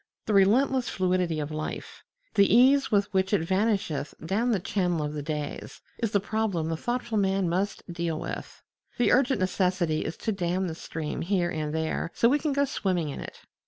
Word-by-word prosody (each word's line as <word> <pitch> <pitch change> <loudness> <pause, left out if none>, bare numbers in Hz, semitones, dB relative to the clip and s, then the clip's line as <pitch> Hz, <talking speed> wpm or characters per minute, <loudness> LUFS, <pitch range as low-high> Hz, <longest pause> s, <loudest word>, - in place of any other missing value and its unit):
The 215 - -1
relentless 245 +6 +3
fluidity 180 -3 0
of 150 0 -4
life, 155 0 -6 0.3
the 200 -1 +4
ease 260 +4 +5
with 205 -1 +2
which 190 +1 +1
it 205 - +3
vanisheth 190 -5 0
down 215 +8 0
the 215 -5 +2
channel 175 -3 0
of 150 0 -3
the 150 - -4
days, 150 -1 -5 0.2
is 230 - 0
the 200 - +2
problem 200 -5 -1
the 165 - -1
thoughtful 240 +3 -2
man 195 -1 +1
must 190 +4 -1
deal 170 -2 -2
with. - - -7 0.3
The 245 - +3
urgent 260 +1 +3
necessity 185 -3 +1
is 160 - -5
to 225 - -2
dam 185 -1 -1
the 165 - -4
stream 160 -1 -5
here 175 -1 0
and 155 -2 -3
there 160 +1 -2
so 235 - +4
we 290 +3 +3
can 300 0 -1
go 280 +1 +2
swimming 180 - -1
in 140 - -6
it. - - -9
190 Hz, 195 wpm, -27 LUFS, 165-220 Hz, 0.3 s, ease